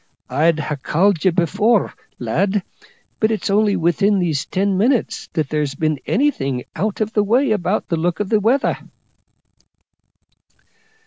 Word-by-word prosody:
I'd 155 +5 +2
ha' 150 -2 -4
called 180 +3 +1
ye 190 - +5
before, 200 +6 +1 0.2
lad, 190 - 0 0.6
but 220 - +2
it's 220 -2 -2
only 205 0 +3
within 195 +5 +2
these 165 -7 -1
ten 195 +1 0
minutes 235 +5 0
that 155 -5 -1
there's 150 -2 -1
been 155 -1 -1
anything 140 - 0
out 210 +2 -2
of 215 +1 -1
the 210 - +2
way 240 +5 +2
about 205 0 0
the 170 - 0
look 170 +1 -1
of 205 -2 -2
the 215 - +3
weather." 240 +7 +1
190 Hz, 145 wpm, -19 LUFS, 155-215 Hz, 0.6 s, ye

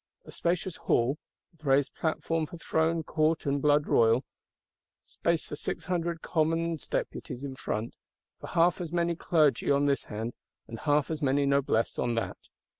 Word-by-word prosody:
A - - -11
spacious 180 +2 -1
Hall: 125 +5 +1 0.3
with 160 -2 -28
raised 140 0 +2
platform 160 0 -1
for 175 - -9
Throne, 165 0 0
Court 155 +1 +1
and 140 0 0
Blood 150 0 +4
royal; 115 +3 +3 0.8
space 170 -1 -1
for - - -6
six 150 - -4
hundred 170 -2 -2
Commons 165 -1 0
Deputies 125 - -4
in 135 -2 -5
front; 110 -3 -3 0.5
for - - -8
half 175 +2 +2
as 170 -3 -5
many 170 0 +1
Clergy 155 -6 +2
on 140 0 +3
this 140 -3 +1
hand, 110 +3 -4 0.3
and 115 - -7
half 150 0 +1
as 155 -1 -3
many 140 0 +2
Noblesse 140 -5 +1
on 120 -1 0
that. 115 - -2
150 Hz, 165 wpm, -29 LUFS, 135-165 Hz, 0.8 s, Blood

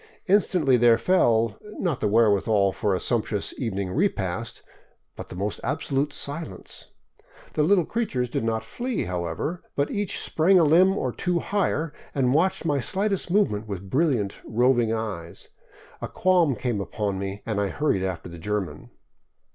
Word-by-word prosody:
Instantly 180 -9 +3
there 120 -1 +5
fell, 115 - +2
not 170 -11 -2
the - - +1
wherewithal 105 -2 +3
for 95 +1 0
a - - -1
sumptuous 110 -4 -1
evening 100 -6 -2
repast, 115 - -2 0.5
but - - -9
the - - -8
most 100 +3 -3
absolute 140 +1 -1
silence. 145 +3 -6 0.7
The 155 - +1
little 175 +2 +4
creatures 190 - -1
did 115 - -2
not 110 -1 -1
flee, 245 - -3
however, 90 - -3
but 140 0 0
each 205 -2 -2
sprang 180 +4 +3
a 175 - +6
limb 180 +6 +5
or 130 - -1
two 175 +7 -1
higher 165 -5 -1 0.2
and 130 -2 +2
watched 170 +3 +1
my 145 -3 +1
slightest 195 - -1
movement 170 - +1
with 100 -2 -6
brilliant, 130 -10 +1
roving 120 0 +2
eyes. 105 -7 -5 0.5
A - - -3
qualm 175 -7 +2
came 115 -2 -2
upon 100 -1 -3
me 100 +1 -5
and 105 -2 -1
I 100 - +1
hurried 145 -3 0
after 95 -2 -3
the 85 -1 -10
German. 105 +1 -4
120 Hz, 155 wpm, -25 LUFS, 100-165 Hz, 0.7 s, a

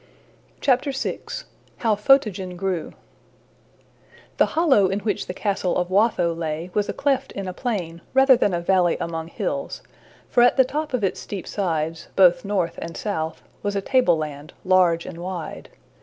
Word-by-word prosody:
VI. 265 +1 +1 0.6
How 225 -2 +1
Photogen 205 -6 +2
Grew 185 -3 -2 1.4
THE - - +4
hollow 270 - +5
in 195 +2 -2
which 205 -3 -2
the - - -4
castle 195 -3 -1
of 180 0 -1
Watho 190 -4 +3
lay 165 +1 -4
was 205 -1 0
a - - -1
cleft 275 -1 0
in 195 -1 -5
a 185 - -4
plain 180 -7 -3
rather 265 0 +7
than 205 - +1
a 175 -1 -1
valley 180 -1 +2
among 165 -1 -4
hills, - - -4 0.4
for 240 - +3
at 245 +2 +5
the 260 - +6
top 295 +1 -2
of 235 - -3
its 195 - 0
steep 195 -3 -6
sides, 165 -4 -2
both 180 -2 +5
north 195 -5 -1
and 165 - -6
south, 160 -6 -3 0.2
was 205 0 -2
a - - +1
tableland, 155 - 0
large 180 -3 +3
and 165 - -8
wide. 175 -3 -6
190 Hz, 160 wpm, -23 LUFS, 170-225 Hz, 1.4 s, rather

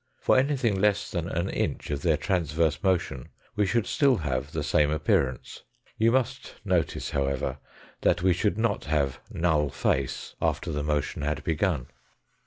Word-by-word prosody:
For - - +2
anything 130 -7 +2
less 105 -1 +2
than 85 -1 -2
an 85 +2 -1
inch - - -2
of 70 -1 -2
their 80 -2 +2
trans 80 -1 -1
verse 80 -1 +1
motion 85 -9 0 0.3
we 105 -1 +2
should 115 +1 +1
still 140 -3 +3
have 70 - -2
the 80 -2 -2
same 75 0 +3
appearance. 70 -4 0 0.3
You 115 +1 +3
must 130 +1 -1
notice, 90 -5 0
however, 70 -1 -1 0.4
that 90 +1 +2
we 95 -1 +5
should 100 +3 0
not 115 +1 0
have 70 -3 0
null 80 -4 +1
face 65 -1 -1
after - - 0
the 75 - -2
motion 75 -1 -1
had 75 +1 -2
begun. 80 -4 0
80 Hz, 165 wpm, -27 LUFS, 75-100 Hz, 0.4 s, we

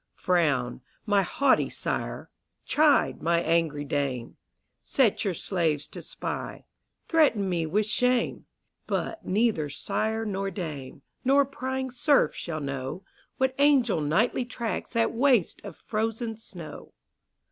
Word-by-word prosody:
Frown, 145 -9 +1 0.2
my 205 -2 +3
haughty 270 +8 +2
sire! - - -4 0.3
chide, 300 -1 +3
my 170 0 +2
angry 160 -3 +1
dame! 135 -4 -2 0.5
Set 250 -7 +2
your 195 -5 -1
slaves 160 -6 -1
to - - -8
spy; - - -5 0.4
threaten 285 - +3
me 170 -3 0
with 210 +6 +1
shame: 250 +3 +1 0.4
But 330 - -2
neither 200 -7 +1
sire 215 +8 -2
nor 195 -1 -2
dame, 150 -7 -6 0.2
nor 275 +2 +4
prying 260 -1 -4
serf 280 +3 +3
shall 155 -3 -5
know, 140 +5 -4 0.3
What 260 0 +1
angel 270 - +4
nightly 190 +12 +1
tracks 235 -4 -4
that 230 0 +2
waste 245 - +2
of - - -8
frozen 225 +1 -2
snow. 175 -9 -9
205 Hz, 125 wpm, -27 LUFS, 160-250 Hz, 0.5 s, nor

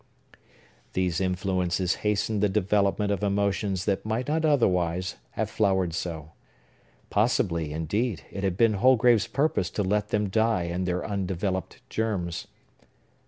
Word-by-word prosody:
These 90 -1 0
influences 90 -1 0
hastened 105 0 0
the 105 - +3
development 100 0 +1
of 100 - -1
emotions 100 -1 0
that 100 -2 0
might 110 +3 -2
not 155 +2 0
otherwise 90 - +1 0.2
have - - 0
flowered 95 -5 +1
so. 80 -2 -5 0.8
Possibly, 90 -8 +1
indeed, 80 - -2
it 100 - -5
had 95 -2 0
been 115 0 +4
Holgrave's 120 0 +4
purpose 140 - 0
to 105 - -2
let 105 +2 0
them 105 -1 0
die 110 -2 +2
in 85 +2 -2
their 90 0 -1
undeveloped 95 -2 -3
germs. 95 -7 -2
100 Hz, 130 wpm, -26 LUFS, 90-105 Hz, 0.8 s, been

